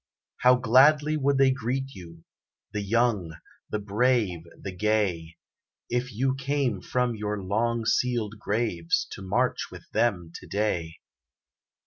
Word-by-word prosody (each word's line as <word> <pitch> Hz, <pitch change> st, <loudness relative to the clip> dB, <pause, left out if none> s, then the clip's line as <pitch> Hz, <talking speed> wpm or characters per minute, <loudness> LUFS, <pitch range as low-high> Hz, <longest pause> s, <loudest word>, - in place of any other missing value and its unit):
How 125 Hz, 0 st, +5 dB
gladly 140 Hz, +5 st, +4 dB
would 140 Hz, -2 st, +1 dB
they 135 Hz, -1 st, +5 dB
greet 135 Hz, +1 st, -3 dB
you, 85 Hz, -3 st, -12 dB, 0.5 s
The 105 Hz, -, -1 dB
young 100 Hz, -5 st, +1 dB, 0.3 s
the -, -, -1 dB
brave 105 Hz, -2 st, +1 dB, 0.2 s
the 100 Hz, -, -6 dB
gay, 90 Hz, -5 st, -1 dB, 0.5 s
If 125 Hz, +1 st, -1 dB
you 130 Hz, +4 st, 0 dB
came 135 Hz, -6 st, -1 dB
from 125 Hz, -1 st, 0 dB
your 105 Hz, -1 st, -3 dB
long 115 Hz, +4 st, -1 dB
sealed 115 Hz, -4 st, 0 dB
graves, 100 Hz, -7 st, 0 dB
To -, -, -8 dB
march 110 Hz, +7 st, 0 dB
with -, -, -11 dB
them 90 Hz, -8 st, 0 dB
to -, -, -10 dB
day. 85 Hz, -6 st, -1 dB
110 Hz, 130 wpm, -26 LUFS, 100-125 Hz, 0.5 s, How